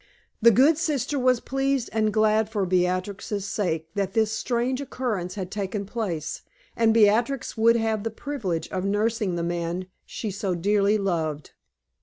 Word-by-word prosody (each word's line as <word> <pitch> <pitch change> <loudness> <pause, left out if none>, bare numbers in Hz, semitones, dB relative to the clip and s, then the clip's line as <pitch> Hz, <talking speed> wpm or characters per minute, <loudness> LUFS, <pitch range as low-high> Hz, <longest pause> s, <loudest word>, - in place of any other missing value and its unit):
The 235 - +8
good 275 +8 +5
sister 290 -4 -1
was 255 -1 +3
pleased 270 -1 -1
and 215 -1 +2
glad 215 0 +2
for 210 -3 -1
Beatrix's 185 +3 -1
sake 165 -6 -2
that 195 -1 -2
this 220 -1 +2
strange 245 +3 -1
occurrence 220 -9 -3
had 190 -2 -5
taken 200 0 -3
place, 195 -8 -4 0.3
and 230 -1 +3
Beatrix 230 +4 +2
would 230 +1 +4
have 225 -2 0
the 225 - -2
privilege 220 - -4
of 185 -1 -3
nursing 205 -1 0
the 170 - -2
man 170 +1 -2 0.2
she 215 - -4
so 195 -2 -2
dearly 205 +3 +2
loved. 160 -7 -2
210 Hz, 155 wpm, -25 LUFS, 185-230 Hz, 0.3 s, The